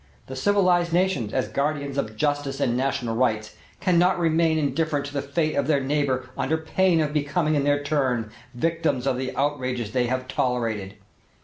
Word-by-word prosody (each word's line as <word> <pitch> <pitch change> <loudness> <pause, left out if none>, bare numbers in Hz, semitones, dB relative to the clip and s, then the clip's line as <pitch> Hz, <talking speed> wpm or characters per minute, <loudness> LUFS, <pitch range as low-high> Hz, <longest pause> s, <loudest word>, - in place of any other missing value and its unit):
The 130 - -8
civilized 180 +1 +2
nations, 175 - +1
as 130 - 0
guardians 140 -1 -2
of 110 -6 -2
justice 145 +2 -1
and 120 - +1
national 125 -3 -1
rights, 110 -3 0 0.2
cannot 180 0 +3
remain 165 -1 +2
indifferent 150 -1 0
to 145 - -8
the 140 - -1
fate 155 +3 -1
of 140 -1 0
their 150 -3 +3
neighbor 135 -2 0
under 160 - 0
pain 170 +2 +2
of 150 -1 -1
becoming 150 +2 0
in 145 -2 +1
their 145 0 +2
turn 130 -7 0 0.2
victims 160 -2 0
of 135 -2 +1
the 130 0 -3
outrages 130 -5 -1
they 125 0 +1
have 130 +1 -2
tolerated. 115 -7 -1
140 Hz, 175 wpm, -24 LUFS, 130-160 Hz, 0.2 s, cannot